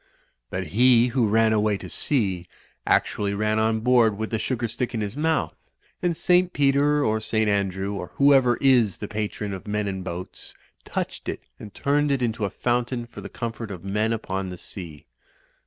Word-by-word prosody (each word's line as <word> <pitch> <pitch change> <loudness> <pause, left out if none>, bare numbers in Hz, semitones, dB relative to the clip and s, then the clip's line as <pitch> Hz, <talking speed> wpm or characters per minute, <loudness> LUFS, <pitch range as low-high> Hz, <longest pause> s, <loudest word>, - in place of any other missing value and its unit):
But - - -3
he 125 +2 +5
who 120 -2 +2
ran 110 +1 +3
away 105 -1 +2
to - - -9
sea 95 -11 -1 0.4
actually 100 -1 +1
ran 105 +1 +1
on 110 0 +1
board 115 -3 +4
with 110 +1 -4
the 110 - 0
sugar 120 -1 -1
stick 120 +2 -3
in 110 - -1
his 105 +2 -4
mouth; 150 - 0 0.5
and 175 -3 0
St. 180 +1 +3
Peter 145 +1 +3
or 110 0 +1
St. 110 0 0
Andrew, 100 -1 0
or 95 -3 -5
whoever 135 -3 +5
is 125 -7 +4
the 105 - -5
patron 105 -1 -3
of 95 +2 -8
men 105 0 -1
in 95 -1 -3
boats, 90 0 -7 0.3
touched - - -4
it - - -4 0.2
and 105 - -9
turned 145 +6 +1
it 135 -2 +1
into 110 -2 -1
a - - -1
fountain 120 +1 -1
for 120 - -11
the - - -8
comfort 115 -2 -5
of 95 -3 -7
men 105 +3 0
upon 95 -4 -3
the 90 - -7
sea. 85 -5 -9
110 Hz, 190 wpm, -24 LUFS, 100-125 Hz, 0.5 s, he